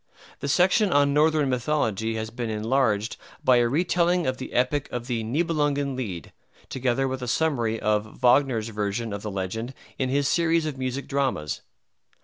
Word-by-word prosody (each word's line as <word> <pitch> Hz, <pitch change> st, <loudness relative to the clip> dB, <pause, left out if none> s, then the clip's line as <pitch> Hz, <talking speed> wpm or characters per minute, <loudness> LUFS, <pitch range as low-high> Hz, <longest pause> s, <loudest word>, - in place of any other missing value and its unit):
The -, -, -4 dB
section 185 Hz, -, +3 dB
on 140 Hz, -2 st, +4 dB
Northern 155 Hz, 0 st, +3 dB
Mythology 115 Hz, -4 st, 0 dB
has 110 Hz, 0 st, -4 dB
been 120 Hz, -1 st, -4 dB
enlarged 110 Hz, -1 st, 0 dB, 0.3 s
by 130 Hz, -1 st, +5 dB
a 120 Hz, -1 st, +3 dB
retelling 175 Hz, +4 st, +1 dB
of 130 Hz, 0 st, -1 dB
the 130 Hz, -, -6 dB
epic 130 Hz, +3 st, 0 dB
of 120 Hz, -1 st, -4 dB
the 120 Hz, -3 st, -2 dB
"Nibelungen 145 Hz, +1 st, 0 dB
Lied," 95 Hz, -, -5 dB, 0.4 s
together 130 Hz, +1 st, 0 dB
with 130 Hz, 0 st, -4 dB
a 125 Hz, -, -4 dB
summary 120 Hz, -6 st, 0 dB
of 105 Hz, 0 st, -1 dB
Wagner's 125 Hz, -3 st, +3 dB
version 105 Hz, +1 st, -2 dB
of 100 Hz, -, -5 dB
the 105 Hz, -, -4 dB
legend 105 Hz, +6 st, -4 dB, 0.2 s
in 130 Hz, -1 st, 0 dB
his 140 Hz, +1 st, +1 dB
series 165 Hz, 0 st, +2 dB
of 150 Hz, -3 st, -3 dB
music 130 Hz, +1 st, -4 dB
dramas. 135 Hz, -, -1 dB
130 Hz, 165 wpm, -25 LUFS, 110-145 Hz, 0.4 s, by